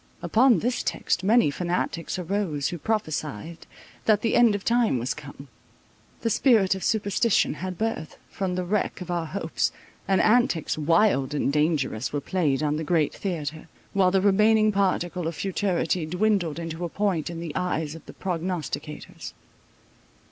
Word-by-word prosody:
Upon 235 -4 +4
this 245 +2 0
text 180 - -1
many 215 -5 +4
fanatics 175 +1 -2
arose, 180 -5 -1
who 175 - -5
prophesied 160 - -3 0.4
that 215 -1 +4
the 225 - +1
end 235 -4 +5
of 200 - -5
time 235 - +2
was 120 +2 -2
come. 145 -1 -11 0.7
The 230 - 0
spirit 215 -6 +4
of 190 -2 -6
superstition 215 -1 +2
had 185 +3 -5
birth, 220 -8 -3
from 185 -2 -2
the 185 - -1
wreck 205 +3 -1
of 180 0 -5
our 170 -2 -1
hopes, 165 -2 -1 0.4
and 190 -1 +3
antics 215 -8 +2
wild 155 -3 +2
and 140 -1 0
dangerous 145 -7 0
were 145 - -1
played 150 -3 0
on 150 0 0
the 160 - -3
great 155 -1 +1
theatre, 160 -4 -4 0.3
while 190 -2 +4
the 190 0 +2
remaining 215 +2 +4
particle 180 -3 0
of 165 - -4
futurity 180 -4 -1
dwindled 180 -3 +1
into 165 0 -5
a 170 - -2
point 190 -5 -1
in 170 -1 -6
the 165 -3 -6
eyes 160 -4 -1
of 165 -1 -11
the - - -10
prognosticators. 180 -3 -5
180 Hz, 160 wpm, -25 LUFS, 155-200 Hz, 0.7 s, end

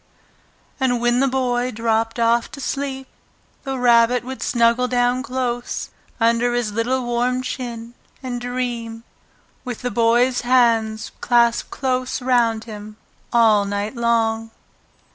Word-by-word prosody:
And 250 -2 +1
when 240 +1 +2
the 275 - +3
Boy 250 -1 0
dropped 225 0 -1
off 235 0 +2
to 280 - -8
sleep, 270 -1 -3 0.6
the 270 -1 -4
Rabbit 240 0 +4
would 260 +1 -7
snuggle 235 +1 +2
down 245 0 +1
close 250 -2 -3 0.3
under 235 +1 +2
his 240 -3 -1
little 245 +4 -1
warm 245 +1 0
chin 235 -2 -6 0.3
and 245 -2 -4
dream, 240 -2 -4 0.6
with 245 -2 -6
the 245 - -1
Boy's 240 +2 +2
hands 230 -3 +2
clasped 235 -1 +2
close 255 -1 -2
round 240 -3 +1
him 215 -1 -10 0.3
all 225 -4 +4
night 205 +3 -3
long. 225 -1 0
240 Hz, 125 wpm, -21 LUFS, 230-250 Hz, 0.6 s, Rabbit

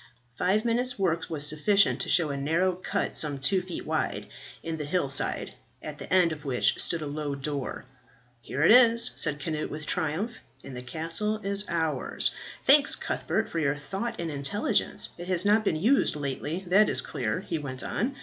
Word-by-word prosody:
Five 195 - 0
minutes' 245 +2 0
work 170 -4 -1
was 150 -2 +1
sufficient 195 +7 +2
to - - -3
show 160 -4 +2
a - - -3
narrow 165 +7 0
cut, 185 - -3
some 145 -2 +3
two 145 +8 +1
feet 180 -1 -7
wide, - - -2 0.4
in 165 -1 -4
the 150 - -4
hill 150 -2 -1
side, 140 - +2 0.3
at - - -8
the - - -9
end 180 -2 +4
of 150 -2 -7
which 130 -4 +1
stood 165 -2 -1
a - - -4
low 145 -1 -4
door. 140 -1 -5 0.6
"Here 145 - -3
it 170 - +6
is," 235 -1 +6
said 150 -2 +2
Cnut, 155 0 -4
with 150 0 -7
triumph, 165 +12 -2 0.3
"and 135 - -9
the 125 - -5
castle 165 +11 +1
is 200 +1 +1
ours. 160 -5 -1 0.3
Thanks, - - +5
Cuthbert, - - -2
for 165 - -4
your 145 -2 0
thought 195 +11 -5
and 170 -2 -3
intelligence. 200 +8 0
It 175 - -7
has 185 0 +3
not 215 +2 +3
been 195 - 0
used 225 - +2
lately, 145 +5 -4
that 195 +4 +4
is - - +2
clear," 110 -3 -3
he 165 - -4
went 130 -3 -4
on. 255 +7 -2
165 Hz, 190 wpm, -27 LUFS, 145-200 Hz, 0.6 s, it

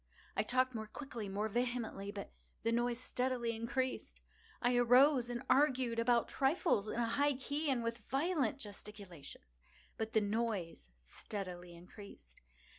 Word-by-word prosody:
I - - +3
talked 255 +3 +2
more 220 -2 -4
quickly—more 215 -6 -4
vehemently; 235 -3 -2
but 200 -1 -7 0.3
the 230 - +2
noise 240 0 +1
steadily 250 -2 -1
increased. 255 +3 -2 0.4
I 245 0 +2
arose 245 +1 +6
and 240 -1 -3
argued 260 -5 +3
about 235 0 +3
trifles, 270 - +1
in - - -3
a 235 - +2
high 285 +5 +2
key 285 +3 -2
and 250 -3 +1
with 230 +1 -2
violent 275 - 0
gesticulations; 195 - -9 0.4
but 220 0 -3
the 220 - +4
noise 205 - -2
steadily 175 - -6
increased. 175 - -13
230 Hz, 135 wpm, -36 LUFS, 205-255 Hz, 0.4 s, arose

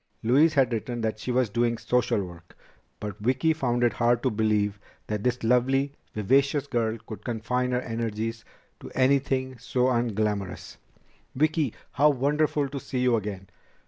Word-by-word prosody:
Louise 145 +8 +4
had 130 -4 +3
written 120 +2 -3
that 110 -1 -2
she 125 - -3
was 125 0 +2
doing 115 +1 +1
social 125 -5 +1
work, 85 -2 -12 0.4
but 105 -3 -6
Vicki 130 +8 +2
found 120 -5 0
it 120 -3 +3
hard 120 0 +2
to 130 - +2
believe 105 -2 +1 0.3
that 105 -1 -3
this 125 -1 0
lovely, 135 +4 +2 0.2
vivacious 135 +6 +2
girl 115 -4 -1
could 105 -2 -8
confine 125 +2 -1
her 125 0 +1
energies 115 -1 -3 0.4
to - - -9
anything 130 -1 +1
so 125 +1 +1
unglamorous. 105 -5 -2 0.6
"Vicki! 155 -2 +1 0.2
How 145 +3 +4
wonderful 145 +1 +1
to 140 0 -5
see 130 - -5
you 125 -2 +3
again!" 100 -3 -4
120 Hz, 155 wpm, -26 LUFS, 110-130 Hz, 0.6 s, Louise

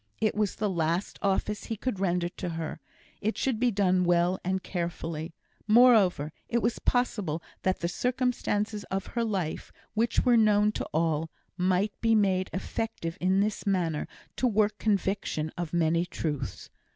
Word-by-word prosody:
It 215 - +2
was 210 -2 0
the 210 - -1
last 170 0 -1
office 205 +1 0
he 225 - -3
could 230 -3 -3
render 180 -2 +1
to 175 0 -5
her; 165 -1 -4 0.4
it 220 +2 -1
should 255 -5 0
be 250 0 +3
done 185 -4 +2
well 175 +1 +2
and 190 +1 -1
carefully. 165 -2 -4 0.3
Moreover, 215 - +5 0.2
it 235 - +2
was 230 +1 0
possible 200 -10 0 0.2
that 185 0 0
the 170 - +1
circumstances 225 -1 -1
of 195 0 -3
her 235 - +1
life, 190 -8 -2 0.2
which 225 +2 +1
were 245 -2 +5
known 210 -1 +4
to - - -4
all, 160 0 0 0.3
might 185 +3 +1
be 225 -1 +4
made 190 -3 +2
effective 185 -3 -3
in 190 +2 +3
this 210 0 -2
manner 170 -6 0 0.3
to 255 - +2
work 215 -2 +1
conviction 195 -6 0
of 175 -3 -4
many 170 0 +2
truths. 145 -6 -4
190 Hz, 160 wpm, -28 LUFS, 170-215 Hz, 0.4 s, Moreover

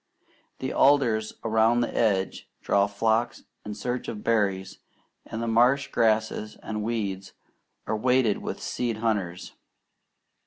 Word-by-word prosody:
The - - -4
alders 120 -6 +3
around 115 +2 +3
the 120 - -2
edge 100 -5 0
draw 100 0 +2
flocks 110 +3 0 0.2
in 105 0 -6
search 125 +4 -3
of 105 -2 -6
berries, 100 -4 0 0.5
and 110 +1 -4
the - - -2
marsh 125 +4 +3
grasses 110 -1 0
and 105 -1 -4
weeds 100 -4 -3 0.5
are 110 - -1
weighted 125 -1 +2
with - - -5
seed 120 -3 -2
hunters. 105 -6 -2
110 Hz, 125 wpm, -26 LUFS, 105-115 Hz, 0.5 s, alders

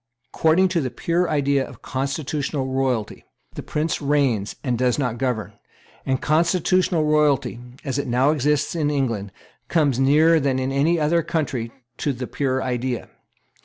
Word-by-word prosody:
According 170 +4 +3
to 175 -3 0
the 130 - -2
pure 170 +8 -1
idea 140 -2 +1
of - - -12
constitutional 140 +1 -2
royalty, 130 -5 -1 0.3
the - - -6
prince 155 +2 -2
reigns 140 -8 +1
and 125 -3 0
does 125 0 +1
not 125 -5 -2
govern; 120 -5 -2 0.5
and 130 -1 +1
constitutional 170 +1 +2
royalty, 145 -5 +2 0.3
as 135 0 -1
it - - -3
now 125 +4 +3
exists 150 0 +1
in 155 -3 0
England, 115 -9 -1 0.4
comes 145 -6 +1
nearer 155 +5 +5
than 135 -2 0
in 130 +1 -1
any 155 +5 +2
other 160 +3 +2
country 140 -8 -2 0.3
to 145 - -1
the 125 0 -5
pure 130 0 -1
idea. 125 -1 -3
140 Hz, 155 wpm, -22 LUFS, 130-155 Hz, 0.5 s, nearer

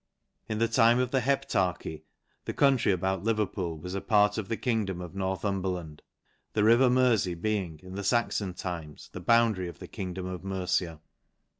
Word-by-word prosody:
In 110 - -1
th< 115 +1 +1
time 115 0 +5
of 125 0 0
the 135 - +3
heptarchy, 95 - -1 0.4
the - - -4
country 135 -7 +4
about 95 0 -1
Leverpoo 105 -6 -1
was 90 +3 -6
a 100 - -2
part 105 0 +3
of 105 - -5
the 115 - -1
kingdom 110 -7 -1
of 90 -1 -7
Northumberland 95 -4 -3 0.3
\ - - -43
th< 105 - +3
river 120 +4 +6
Merfey 115 -9 +2
being, 95 -6 -2
in 95 0 -10
the 100 +1 -4
Saxon 100 -3 0
times, 85 -5 -6
the - - -6
boun 115 -1 +4
dary 95 -2 -4
of 85 - -9
the - - -9
kingdom 95 -3 -5
of 90 -1 -6
Mercia. 90 -4 -2
95 Hz, 180 wpm, -28 LUFS, 90-115 Hz, 0.4 s, river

